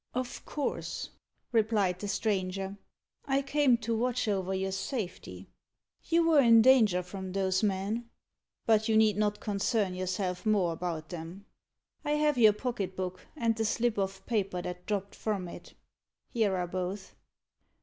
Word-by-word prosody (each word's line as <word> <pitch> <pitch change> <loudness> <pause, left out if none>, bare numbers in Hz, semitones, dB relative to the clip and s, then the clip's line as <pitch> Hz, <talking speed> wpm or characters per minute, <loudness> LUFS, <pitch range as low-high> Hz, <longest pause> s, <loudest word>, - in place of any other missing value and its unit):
"Of 255 -1 -3
course," 295 - -3 0.4
replied 210 -5 +2
the 205 - -4
stranger. 195 -2 -1 0.5
"I 275 0 +1
came 275 -3 +3
to 230 0 0
watch 245 +1 0
over 190 -2 0
your 190 0 -1
safety. 195 -2 -5 0.6
You 335 0 +3
were 310 -3 +6
in 230 -3 +7
danger 220 -8 +5
from 190 +1 -7
those 190 -1 +1
men. 210 +3 -1 0.6
But 220 0 +3
you 220 - +4
need 215 -2 +5
not 210 0 0
concern 200 -1 0
yourself 185 0 -2
more 200 -6 +2
about 165 -2 -4
them. 175 +3 -8 0.6
I 295 - 0
have 300 -3 +2
your 215 -2 +7
pocket 210 -5 -3
book, 185 -1 -5
and 230 -4 +1
the 225 - -1
slip 225 0 0
of 195 0 -3
paper 200 -5 -1
that 180 0 -6
dropped 200 -1 -2
from 200 -5 -2
it. - - -11 0.6
Here 215 -5 +1
are 180 - -1
both. 185 +2 -4
205 Hz, 150 wpm, -30 LUFS, 185-230 Hz, 0.6 s, in